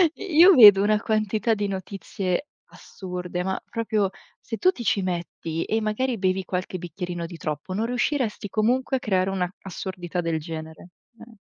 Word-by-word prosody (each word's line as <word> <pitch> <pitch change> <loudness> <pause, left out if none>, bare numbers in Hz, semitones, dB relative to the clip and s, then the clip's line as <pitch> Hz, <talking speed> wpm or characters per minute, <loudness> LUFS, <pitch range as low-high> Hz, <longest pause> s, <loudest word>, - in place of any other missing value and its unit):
I 380 -6 -6
Io 360 +3 +9
vedo 205 - +9
una 210 0 +3
quantità 220 +1 0
di 205 -1 -1
notizie 195 +2 -3 0.2
assurde, 180 -1 -6
ma 190 0 -2
proprio 220 -4 0 0.3
se 225 - -6
tu 370 +7 +4
ti 245 - -8
ci 205 - +1
metti 170 -2 -3
e 220 +1 -1
magari 230 +4 -1
bevi 190 -1 0
qualche 185 0 -3
bicchierino 175 0 -5
di 170 0 -9
troppo, 155 +4 -4
non 215 +4 -1
riusciresti 245 -4 -1
comunque 250 +6 +1
a - - -5
creare 190 -4 0
una 185 -2 -1
assurdità 180 -2 -5
del 165 -1 -1
genere, 160 +2 -8 0.3
eh. 230 -1 -14
195 Hz, 165 wpm, -24 LUFS, 180-225 Hz, 0.3 s, Io